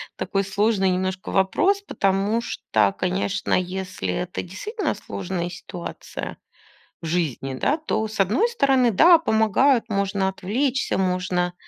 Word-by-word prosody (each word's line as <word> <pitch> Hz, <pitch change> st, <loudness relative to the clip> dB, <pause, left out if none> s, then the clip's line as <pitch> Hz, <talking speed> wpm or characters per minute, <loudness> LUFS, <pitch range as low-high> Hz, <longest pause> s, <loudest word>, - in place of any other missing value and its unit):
такой 195 Hz, 0 st, -1 dB
сложный 195 Hz, 0 st, +1 dB
немножко 185 Hz, +1 st, -2 dB
вопрос, 200 Hz, -, +2 dB
потому 200 Hz, -, 0 dB
что, 105 Hz, -, 0 dB
конечно, 190 Hz, +2 st, -1 dB
если 185 Hz, -, -2 dB
это 180 Hz, -, -3 dB
действительно 415 Hz, -, -3 dB
сложная 180 Hz, -2 st, -4 dB
ситуация 175 Hz, 0 st, -7 dB, 0.6 s
в -, -, -7 dB
жизни, 155 Hz, -5 st, -1 dB
да, 275 Hz, -, +1 dB
то, 220 Hz, -9 st, -2 dB
с 215 Hz, 0 st, -9 dB
одной 220 Hz, -, +3 dB
стороны, 270 Hz, -, +3 dB
да, 335 Hz, -, +7 dB
помогают, 230 Hz, -, +2 dB
можно 200 Hz, -1 st, 0 dB
отвлечься, 245 Hz, +8 st, -1 dB
можно. 180 Hz, -1 st, 0 dB
195 Hz, 125 wpm, -23 LUFS, 180-230 Hz, 0.6 s, да